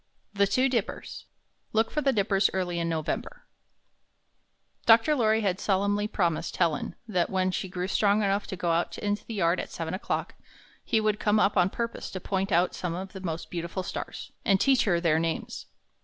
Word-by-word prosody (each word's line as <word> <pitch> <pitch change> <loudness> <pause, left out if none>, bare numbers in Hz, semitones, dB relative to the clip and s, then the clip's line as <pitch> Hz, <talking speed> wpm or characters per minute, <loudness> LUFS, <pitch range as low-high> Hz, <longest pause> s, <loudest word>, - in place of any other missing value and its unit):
THE 200 0 +3
TWO 255 +7 +2
DIPPERS 235 -6 -3 0.5
Look 220 +1 +2
for 300 - 0
the 275 - +3
Dippers 200 -3 +2
early 175 -2 -1
in 170 0 -1
November 165 - -3 1.4
Doctor 230 +6 +6
LoiT}^ 220 -5 +2
had 190 -1 0
solemnly 205 +1 +1
promised 170 -7 -1
Helen 165 -4 0
that 180 -5 0
when 185 -1 +1
she 185 - -3
grew 180 0 -3
strong 205 +1 +2
enough 200 +1 0
to - - -4
go 175 -1 -1
out 165 +1 0
in 205 0 -1
the 225 - -5
yard 170 -2 +2
at - - -4
seven 165 0 -5
o'clock, 185 - -3 0.5
he 220 - +2
would 215 -1 +1
come 210 0 +3
up 205 - +3
on 180 -1 +4
purpose 235 +3 -4
to 190 - -5
point 195 +2 -2
out 175 +1 +3
some 175 -2 -3
of 190 +1 -6
the 190 - -8
most 165 -3 -5
beautiful 170 +2 -3
stars, - - -6
and 195 -3 +3
teach 270 +2 +4
her 175 -5 +2
their 165 -2 +2
names. 165 0 -3
195 Hz, 190 wpm, -27 LUFS, 175-215 Hz, 1.4 s, Doctor